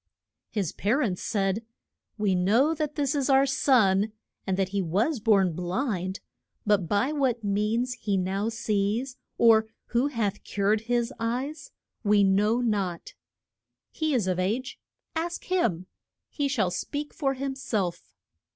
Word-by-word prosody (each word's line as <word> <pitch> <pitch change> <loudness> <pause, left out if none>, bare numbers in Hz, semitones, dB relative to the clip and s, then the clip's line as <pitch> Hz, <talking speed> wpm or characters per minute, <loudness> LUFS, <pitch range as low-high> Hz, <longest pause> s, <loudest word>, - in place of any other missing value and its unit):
His 195 -7 -2
pa 205 +3 0
rents 235 -10 0
said, 200 0 0 0.5
We 205 -3 +1
know 220 - +3
that 300 -2 -3
this 285 -1 0
is 285 -2 0
our 270 0 +5
son, 220 -7 +3 0.3
and 190 -1 0
that 190 -1 0
he 200 0 -1
was 205 - 0
born 200 -5 +3
blind; 185 - -2 0.4
but 205 -5 +2
by 230 +8 +2
what 260 -6 0
means 210 +5 0
he 205 -5 -1
now 195 +4 -1
sees, 225 +3 -1 0.2
or 220 -1 +5 0.2
who 245 +3 +2
hath 225 -8 -2
cured 205 +1 +1
his 240 +2 -1
eyes, 255 +7 -3 0.3
we 205 -1 +4
know 210 +5 +3
not. 200 -7 -2 0.8
He 310 -3 0
is 225 -6 +1
of 185 -1 0
age, 225 +8 -2 0.4
ask 340 +2 -2
him; 345 - 0 0.4
he 285 -2 -1
shall 270 -10 0
speak 290 +10 -4
for 270 -2 -1
him 270 +1 -3
self. 210 -9 -3
220 Hz, 145 wpm, -27 LUFS, 195-265 Hz, 0.8 s, our